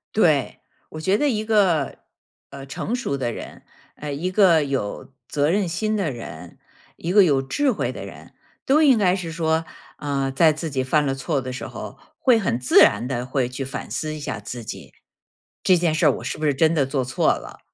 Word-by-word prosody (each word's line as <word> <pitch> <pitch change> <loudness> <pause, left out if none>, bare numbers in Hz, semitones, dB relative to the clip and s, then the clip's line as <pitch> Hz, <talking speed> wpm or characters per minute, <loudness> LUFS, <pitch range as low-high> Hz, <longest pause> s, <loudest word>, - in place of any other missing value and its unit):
对， - - +2 0.3
我 155 - -7
觉 190 +5 +2
得 295 - +1
一 215 -4 -1
个 190 - +2 0.5
呃， 140 0 -9
成 175 - -3
熟 245 - -2
的 120 -3 -2
人， - - -9 0.3
呃， 145 -1 -5
一 170 +6 -2
个 180 -6 +5
有 135 -2 -4
责 145 0 +1
任 200 0 +1
心 215 +6 -1
的 190 -6 0
人， 90 - -9 0.4
一 170 - -4
个 200 0 +6
有 140 -5 +2
智 270 - 0
慧 - - -2
的 - - -7
人， - - -12 0.3
都 290 +4 +4
应 275 -6 +6
该 185 -4 +3
是 180 -3 -3
说， 160 0 0 0.3
呃， 140 -2 -2
在 155 +3 +4
自 155 +2 -5
己 135 -1 0
犯 150 +3 +2
了 135 - 0
错 135 +1 -2
的 130 0 -5
时 130 - -6
候， - - -8 0.2
会 250 -4 +4
很 175 - 0
自 125 0 +1
然 - - +5
地 125 -2 -2
会 130 -1 -1
去 130 +2 -5
反 135 - -7
思 155 0 -3
一 - - -7
下 110 - -4
自 120 +3 -7
己。 95 - -9 0.7
这 185 - +4
件 170 -2 +1
事 160 +1 +1
儿 150 - +7
我 - - -10
是 - - -4
不 155 - -3
是 145 - +3
真 160 +4 +3
的 145 -4 +2
做 135 0 -1
错 125 0 +2
了？ - - -9
155 Hz, 230 characters per minute, -23 LUFS, 135-180 Hz, 0.7 s, 儿